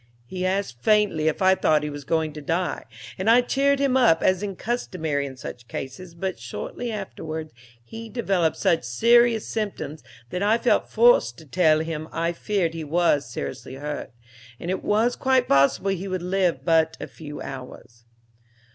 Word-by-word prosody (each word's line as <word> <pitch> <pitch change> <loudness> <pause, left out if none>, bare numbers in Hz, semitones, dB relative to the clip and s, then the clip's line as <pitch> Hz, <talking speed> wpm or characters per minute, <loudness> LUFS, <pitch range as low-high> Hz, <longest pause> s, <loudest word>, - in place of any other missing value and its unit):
He 185 +6 -3
asked 185 -11 -2
faintly 210 - +3
if 160 +4 0
I 190 0 +6
thought 155 -5 +2
he 150 - -2
was 145 -1 -8
going 160 0 0
to 150 - -8
die, 170 +5 -2 0.3
and 190 +4 +1
I 240 +2 +7
cheered 275 +3 +2
him 275 -2 +1
up, 240 -11 +4
as 185 0 +3
is 200 -2 -4
customary 160 -11 -2
in 130 -1 -10
such 120 -1 -9
cases, 165 +9 -7
but 185 -2 -3
shortly 120 - -5
afterwards 160 - -6 0.3
he 225 - -9
developed 195 -9 0
such 165 - +2
serious 230 - +3
symptoms 205 -8 -4 0.3
that 180 - -3
I 210 +3 +3
felt 240 +1 +1
forced 220 - +4
to 160 - -13
tell 155 +1 +3
him 160 -1 -4
I 165 +1 -1
feared 180 -2 -1
he 165 -1 -5
was 150 -4 +1
seriously 130 +2 -6
hurt, 145 +2 -5 0.5
and 175 - -3
it 190 - -3
was 225 +4 +2
quite 260 -1 +2
possible 140 +8 +3
he 195 +1 -3
would 185 -2 -3
live 180 -7 0
but 160 -1 +3
a - - -4
few 150 -2 -9
hours. 125 -3 -9
170 Hz, 175 wpm, -24 LUFS, 150-210 Hz, 0.5 s, I